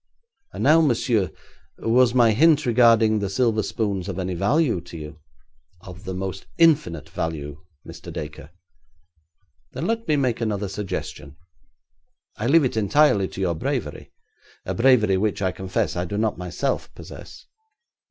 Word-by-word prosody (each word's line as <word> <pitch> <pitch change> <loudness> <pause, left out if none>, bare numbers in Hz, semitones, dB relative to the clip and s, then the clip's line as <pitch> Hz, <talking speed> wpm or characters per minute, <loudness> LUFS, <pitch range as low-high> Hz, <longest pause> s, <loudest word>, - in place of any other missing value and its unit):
And - - -5
now, 155 +4 +6
monsieur, 120 - +1 0.5
was 120 +2 +2
my 120 -3 +5
hint 150 +5 +4
regarding 115 -2 +4
the 100 -1 -2
silver 110 +1 +1
spoons 100 -4 -3
of 95 - -5
any 95 -1 -3
value 110 - +1
to 85 -1 -11
you?' 75 0 -9 0.6
'Of 90 +2 -12
the 95 -1 -4
most 95 0 -5
infinite 150 - +2
value, 75 -2 -5 0.3
Mr. - - -10
Dacre.' 75 -1 -8 1.2
'Then - - -4
let 230 0 -2
me 155 - +2
make 130 -5 0
another 105 -3 -2
suggestion. 95 -7 -6 1.0
I 110 - -3
leave 155 +2 +5
it 125 - -2
entirely 105 -2 +3
to 95 - -8
your 90 -3 +1
bravery; 80 - -4 0.5
a - - -3
bravery 115 -6 +3
which, 105 +2 -1
I 95 -2 0
confess, 95 +1 -2
I 90 0 -2
do 100 +3 -4
not 110 -1 0
myself 90 +10 -3
possess. - - -12
105 Hz, 150 wpm, -23 LUFS, 95-125 Hz, 1.2 s, now